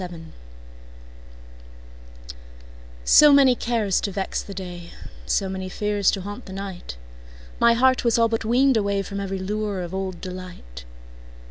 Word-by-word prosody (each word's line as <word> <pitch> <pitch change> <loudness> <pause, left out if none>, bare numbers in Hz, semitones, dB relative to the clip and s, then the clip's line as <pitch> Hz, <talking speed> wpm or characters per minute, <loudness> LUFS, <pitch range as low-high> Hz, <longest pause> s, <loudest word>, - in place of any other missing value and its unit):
Summer 175 -1 -6
Magic 165 0 -13 2.7
SO 300 -1 +8
many 275 -2 +6
cares 225 -6 0
to 200 - -2
vex 195 0 -3
the 200 - -10
day, 175 -2 -8 0.3
So 195 - +1
many 190 0 -5
fears 205 0 0
to 195 - -1
haunt 205 +5 -8
the 190 - -8
night, 190 - -7 0.6
My 235 0 +5
heart 260 +2 +3
was 235 -2 +2
all 230 0 +4
but 225 0 -2
weaned 250 +3 +3
awayFrom 200 -1 -2
every 195 -1 -3
lure 205 0 -3
of 175 0 -6
old 190 -2 -4
delight. 180 - -9
200 Hz, 145 wpm, -23 LUFS, 185-225 Hz, 2.7 s, SO